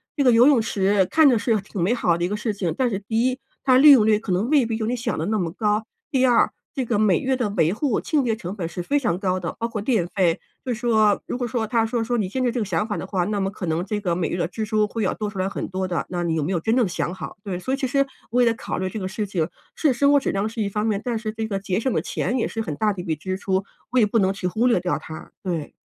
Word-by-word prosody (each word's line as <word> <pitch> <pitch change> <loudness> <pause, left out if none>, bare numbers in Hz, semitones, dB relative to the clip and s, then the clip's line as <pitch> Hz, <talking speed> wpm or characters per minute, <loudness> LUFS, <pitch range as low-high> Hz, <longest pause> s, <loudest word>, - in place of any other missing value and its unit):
这 285 - +1
个 250 - +6
游 235 +3 +6
泳 275 -6 +5
池 195 -2 +2
看 315 -2 +6
着 245 - +3
是 220 -1 +1
挺 195 -2 -6
美 205 - +2
好 175 -8 +1
的 170 - -2
一 - - 0
个 210 - -2
事 215 0 -2
情， 180 -5 -2
但 255 -2 +2
是 195 - -2
第 225 +4 0
一 255 - -1 0.3
它 255 -1 +6
利 295 +2 +9
用 245 -6 +7
率 215 -1 +4
可 210 -4 -5
能 195 +7 0
未 285 -5 +4
必 225 -1 -2
有 220 - -2
你 245 +3 0
想 235 -1 -2
得 - - -1
那 215 +1 0
么 170 -4 -1
高。 210 +2 0 0.3
第 260 -2 +3
二 245 -2 +4 0.2
这 265 -5 -2
个 230 -2 0
每 205 -5 +3
月 265 0 0
的 245 -5 -1
维 175 -4 +1
护 245 +1 0
清 300 -3 0
洁 230 -3 +1
成 195 -3 -6
本 180 -5 -3
是 175 +2 -5
非 285 +11 0
常 205 -10 0
高 185 -2 0
的， 170 -2 -5
包 230 - -1
括 225 -3 -4
电 210 -7 +1
费。 175 -3 +1 0.3
“就 250 - -1
是 225 - -6
说， 220 -4 +3
如 - - -3
果 245 - -2
说 230 -2 -2
他 225 0 +2
说 230 +1 -1
说：” 240 +2 -1
你 205 -5 0
现 260 +6 -2
在 250 - +2
这 240 +1 -2
个 210 - -1
想 195 +3 -1
法 210 - -2
的 - - -4
话， 190 -2 -1
那 205 0 -1
么 195 0 -1
可 195 -3 -6
能 160 +2 0
这 210 +1 -2
个 180 -4 -1
每 170 -3 -1
月 - - -2
的 - - 0
支 220 +5 -5
出 215 0 +1
会 225 +1 -3
要 - - +1
多 210 -1 -3
出 205 - -10
来 185 0 0
很 - - -4
多 185 0 -3
的， 175 -2 -2
那 175 -1 -2
你 165 -1 0
有 155 - 0
没 190 - -2
有 175 - +1
真 220 +7 +1
正 240 - +3
想 175 0 -2
好？ - - -7
“对， 185 -3 -4
所 260 +8 -3
以 270 - +1
其 270 - -1
实 275 +2 +2 0.3
我 250 - +3
也 235 -2 +4
考 230 - -5
虑 185 0 -2
这 220 - -6
个 185 - -3
事 210 +1 -3
情， 170 -5 -1 0.3
是 300 - +2
生 280 +3 +3
活 - - +6
质 - - -1
量 195 +2 -1
是 225 0 -4
一 200 - 0
方 210 +2 -2
面， 210 -3 0
但 235 -3 -1
是 215 -1 -3
这 220 0 -3
个 195 -2 -2
节 190 -2 -2
省 260 +3 0
的 - - +1
钱 250 - -2
也 235 - 0
是 225 - -4
很 160 -9 -4
大 210 -1 +1
的 185 - -6
一 - - -8
笔 160 -4 -1
支 185 +5 -3
出， 190 -1 -1 0.3
我 255 - +3
也 220 - +5
不 210 +2 0
能 190 0 +3
去 190 -2 -3
忽 220 +7 0
略 235 -7 +3
掉 175 0 -1
它， 160 0 -10
对。 170 -6 -3
215 Hz, 355 characters per minute, -23 LUFS, 185-235 Hz, 0.3 s, 利